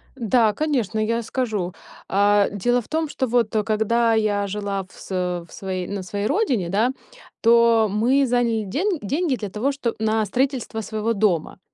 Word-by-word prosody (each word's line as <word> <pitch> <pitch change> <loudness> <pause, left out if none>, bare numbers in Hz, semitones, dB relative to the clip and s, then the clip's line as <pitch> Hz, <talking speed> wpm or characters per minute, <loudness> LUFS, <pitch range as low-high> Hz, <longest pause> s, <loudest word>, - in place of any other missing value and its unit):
Да, 230 -3 +2
конечно, 245 -8 -1
я 230 +2 0
скажу. 215 -7 -2 0.3
А, 205 +1 +3
дело 240 +5 +1
в - - -17
том, 320 0 -1
что 265 -2 -2
вот, 230 -2 +1
э, 215 - +2
когда 225 +2 +2
я 205 -2 +1
жила 200 -1 -3
в 185 - -21
с - - -11
э, 180 -2 -2
в - - -22
своей, 185 -2 -4
на 200 -2 -4
своей 200 +2 -3
родине, 250 - 0
да, 215 +7 +2 0.5
то 230 -1 +5
мы 250 +7 +3
заняли 235 -3 +1
ден 345 - -1
деньги 285 - 0
для 210 -4 -5
того, 225 +8 -1
что 260 -4 -3
на 220 0 +1
строительство 250 0 -1
своего 220 +1 -2
дома. 195 -6 0
220 Hz, 180 wpm, -22 LUFS, 205-245 Hz, 0.5 s, то